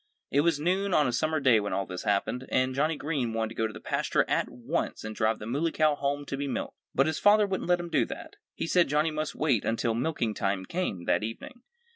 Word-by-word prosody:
It 140 - +4
was 160 -2 +2
noon 185 +4 +1
on 150 - +4
a - - 0
summer 155 +5 +1
day 130 -6 +5
when 100 -1 -3
all 100 - -1
this 90 -1 -7
happened. 105 +5 0
And 130 0 +1
Johnnie 150 +3 +1
Green 140 -7 -2
wanted 110 -1 -1
to - - -9
go 110 - 0
to 110 - -9
the - - -8
pasture - - 0
at - - 0
once 130 +8 -3
and 110 0 -6
drive 110 0 +1
the 105 - -8
Muley 145 +8 0
Cow 155 -1 +3
home 145 0 -2
to 135 - -4
be 140 0 -2
milked. - - -3 0.2
But 135 - +4
his 160 -1 -1
father 210 0 +6
wouldn't 190 -3 -3
let 175 0 +4
him 175 -1 -6
do - - +3
that. - - -9 0.2
He - - -3
said 175 +1 +3
Johnnie 150 +2 +2
must 155 0 -3
wait 135 -9 +1
until 115 0 0
milking 120 -2 -1
time 95 -2 -1
came, 100 - -3
that - - +2
evening. 245 - -7
140 Hz, 250 wpm, -28 LUFS, 115-160 Hz, 0.2 s, father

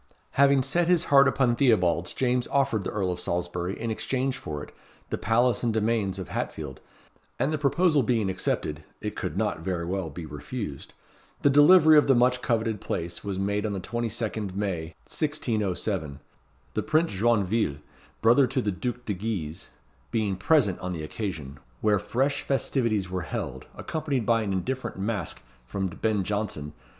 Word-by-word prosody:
Having 140 -1 +4
set 170 +6 +1
his 175 -2 +4
heart 140 0 +8
upon 130 -2 +2
Theobalds, 90 -10 +2
James 125 -1 +1
offered 135 -7 +1
the - - -1
Earl 95 -3 -1
of 90 - -4
Salisbury, 90 +2 -2
in 115 - -2
exchange 130 +3 -1
for 75 - -6
it, - - -12 0.4
the - - 0
palace 120 +3 +2
and 120 - +1
domains 110 -3 0
of 95 - -6
Hatfield; - - -4 0.6
and 150 - 0
the 155 - -1
proposal 150 +2 +3
being 115 -4 +1
accepted 75 -5 -2 0.2
(it - - -4
could - - -4
not - - 0
very 85 0 -2
well 95 -1 -2
be 80 +3 -7
refused), 75 - -6 0.5
the 140 - +5
delivery 155 +2 +8
of 145 - +1
the 135 - +5
much 125 +1 +3
coveted 110 -3 0
place 85 -3 -4
was 100 -2 -3
made 100 +1 0
on 105 -2 -1
the 95 - -2
22nd 110 -2 -3
May, 85 -6 -3
1607; 105 - -2 0.5
the - - 0
Prince 155 -2 +1
Joinville, 105 -6 +1 0.4
brother 120 +4 +5
to 135 +2 -1
the 105 -5 0
Duke 125 +5 -4
de 105 - -1
Guise, 90 -6 -4 0.4
being 110 -4 0
present 105 - +3
on 90 0 -4
the 80 -3 -5
occasion, 75 -6 -5 0.2
where 105 -2 +3
fresh 135 +7 0
festivities 115 -8 0
were 90 -1 -1
held, 85 - -5
accompanied 145 -7 -2
by 115 -1 +3
an 105 -3 -2
indifferent 125 +8 -2
Masque 100 +1 -3 0.2
from 95 +8 -2
Ben 105 +3 0
Jonson. 90 -8 -3
110 Hz, 165 wpm, -27 LUFS, 90-125 Hz, 0.6 s, heart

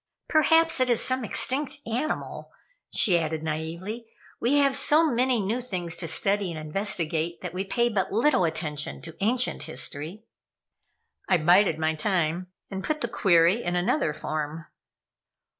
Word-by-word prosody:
"Perhaps 325 0 +4
it 255 -1 +2
is 240 -2 +3
some 255 -1 +1
extinct 270 +6 0
animal," 245 +7 -4 0.4
she 180 -5 +4
added, 160 -1 -3
naively. 170 +9 -5 0.3
"We 250 +5 +2
have 280 -2 +3
so 305 +3 +4
many 250 0 +2
new 215 +5 -1
things 180 -8 -3
to 170 - -3
study 195 +4 +1
and 160 - -6
investigate, 165 -1 -2
that 180 -2 -6
we 185 +1 -2
pay 235 +4 +1
but 205 -5 -1
little 235 -1 +3
attention 150 -3 -3
to 165 -1 -10
ancient 245 +4 +1
history." 160 +9 -5 1.1
I - - +5
bided 175 +1 +4
my 160 0 0
time 175 +1 -1 0.2
and 195 0 -5
put 310 -1 -2
the 235 - 0
query 180 -1 +3
in 175 -3 -2
another 175 - +1
form. 155 +1 -5
190 Hz, 150 wpm, -26 LUFS, 165-240 Hz, 1.1 s, I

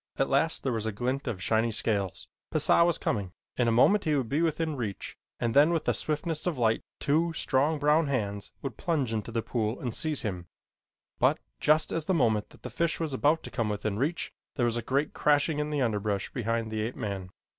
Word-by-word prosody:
At 135 - +1
last 150 +4 +2
there 130 - 0
was 110 -2 -2
a - - 0
glint 125 +6 -2
of 95 -5 -3
shiny 110 +2 +2
scales. 100 -4 -2 0.2
Pisah - - +5
was 170 -1 +3
coming. 100 -4 -2 0.2
In 120 - +1
a - - +3
moment 195 - +4
he 155 -2 +2
would 130 -5 -1
be 145 +4 +1
within 160 -1 0
reach 110 -7 -5 0.2
and 115 -1 0
then 145 +3 +6
with 170 -2 0
the - - +2
swiftness 155 +2 -2
of 170 -6 -1
light 115 -2 +2 0.2
two 165 +4 +1
strong, 145 +1 +1
brown 150 +2 +3
hands 100 -7 -2
would 135 -6 -5
plunge 145 -9 -1
into 110 +1 -3
the 115 -1 -1
pool 110 -1 -2
and 120 -4 -3
seize 155 +1 -1
him, 90 -5 -4 0.7
but, - - +4 0.2
just 155 +1 +3
at 165 0 -2
the 190 - +2
moment 110 -8 +2
that - - -19
the - - -6
fish 170 0 0
was 160 -4 -2
about 150 +5 +2
to - - -8
come 115 -3 -1
within 105 0 -2
reach, 155 +6 -1 0.2
there 125 - +1
was 120 -1 +1
a 120 - -1
great 140 +5 0
crashing 150 +1 +2
in 150 0 -1
the 150 -2 -1
underbrush 105 -3 -1
behind 115 -2 -2
the 110 -1 -2
ape 115 +3 -3
man. 100 -6 -4
130 Hz, 220 wpm, -28 LUFS, 110-150 Hz, 0.7 s, then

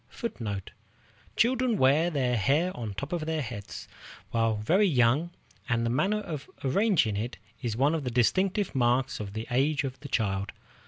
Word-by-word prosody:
Children 245 -1 +2
wear 145 +5 +4
their 130 -6 0
hair 145 - +1
on 110 -5 -5
top 140 - -5
of 160 -3 -2
their 160 -2 -1
heads 110 -4 -7 0.4
while 115 -1 +2
very 175 - +3
young, 135 +2 +3 0.4
and 115 -1 +1
the 115 - 0
manner 195 - +1
of 155 -8 -6
arranging 145 - +2
it 115 +5 -3 0.2
is 115 -2 -2
one 140 +5 +3
of 160 -3 -1
the 125 - -2
distinctive 185 - +1
marks 125 0 +1
of 100 -2 -6
the 110 +1 -4
age 140 +3 +2
of 135 -1 -5
the 145 - -9
child. 100 -5 -1
135 Hz, 165 wpm, -28 LUFS, 115-165 Hz, 0.4 s, wear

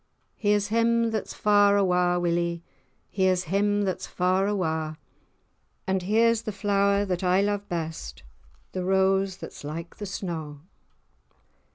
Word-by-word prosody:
Here's 205 -1 +1
him 230 +1 +2
that's 220 -2 -4
far 205 -1 +4
awa', 180 -2 +2
Willie, 170 -1 -1 0.5
Here's 185 -2 +2
him 205 +4 +1
that's 185 -1 -3
far 185 +2 +1
awa', 160 -6 -2 0.9
And 190 0 0
here's 225 +4 +3
the 215 - -4
flower 200 0 +1
that 180 -1 -2
I 180 +1 +3
lo'e 205 0 0
best, 160 - -5 0.5
The 185 - -3
rose 190 0 +2
that's - - -10
like 165 +3 -7
the 205 - -6
snaw. 165 -6 -5
190 Hz, 130 wpm, -26 LUFS, 175-205 Hz, 0.9 s, far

